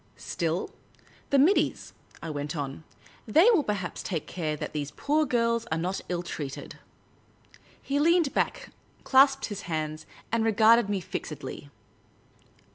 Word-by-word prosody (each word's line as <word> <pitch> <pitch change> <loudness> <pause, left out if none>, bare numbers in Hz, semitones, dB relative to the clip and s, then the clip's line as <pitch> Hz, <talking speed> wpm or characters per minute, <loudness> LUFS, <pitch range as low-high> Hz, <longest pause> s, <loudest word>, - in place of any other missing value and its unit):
" - - -35
Still 170 0 -3 0.3
— - - -29
the 280 - +3
middies," 320 +9 +2 0.3
I 160 - -4
went 145 +2 -4
on; 140 +1 -5 0.2
" - - -25
they 330 - +9
will 400 -9 +4
perhaps 200 -6 -3
take 165 -6 -3
care 155 -4 -3
that - - -5
these 145 -2 -3
poor 300 - 0
girls 230 -2 +1
are 160 - +1
not 180 +4 -2
ill 175 -1 -2
treated." 145 -5 -6 1.0
He 280 +1 -1
leaned 335 -1 +3
back, - - -1 0.3
clasped 270 0 +5
his 205 -2 -6
hands, 155 -1 -3 0.2
and 230 0 +1
regarded 225 0 +5
me 200 -2 -1
fixedly. - - -6
200 Hz, 150 wpm, -27 LUFS, 160-270 Hz, 1.0 s, they